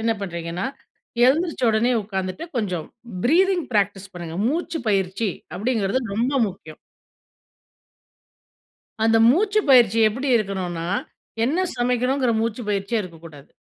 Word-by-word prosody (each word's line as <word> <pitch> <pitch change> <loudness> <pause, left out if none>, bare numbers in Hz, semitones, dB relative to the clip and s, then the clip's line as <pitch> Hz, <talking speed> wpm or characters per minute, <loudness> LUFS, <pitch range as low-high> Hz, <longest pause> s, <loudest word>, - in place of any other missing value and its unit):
என்ன 225 0 +2
பண்ணுறீங்கன்னா, 170 0 -4 0.6
எழுந்திரிச்ச 315 +2 +1
உடனே 225 +3 +2
உட்காந்துட்டு 190 - -4
கொஞ்சம் 185 -8 -2 0.4
ப்ரீத்திங் 355 +5 +3
ப்ராக்டிஸ் 200 -2 0
பண்ணுங்க 170 -2 -7
"மூச்சு 325 +4 -1
பயிற்சி" 195 +1 0 0.3
அப்படிங்கிறது 215 +2 0
ரொம்ப 240 +6 0 0.2
முக்கியம். 160 -5 -12 2.3
அந்த 225 0 +4
மூச்சு 405 - +2
பயிற்சி 235 -4 +6
எப்படி 260 +6 -4
இருக்கணுன்னா, 185 -5 -3 0.6
என்ன 325 +10 +1
சமைக்கணும்ங்கிற 250 +1 +1
மூச்சு 230 +1 -2
பயிற்சியே 205 +2 0
இருக்கக்கூடாது. 165 -5 -12
220 Hz, 105 wpm, -22 LUFS, 190-255 Hz, 2.3 s, பயிற்சி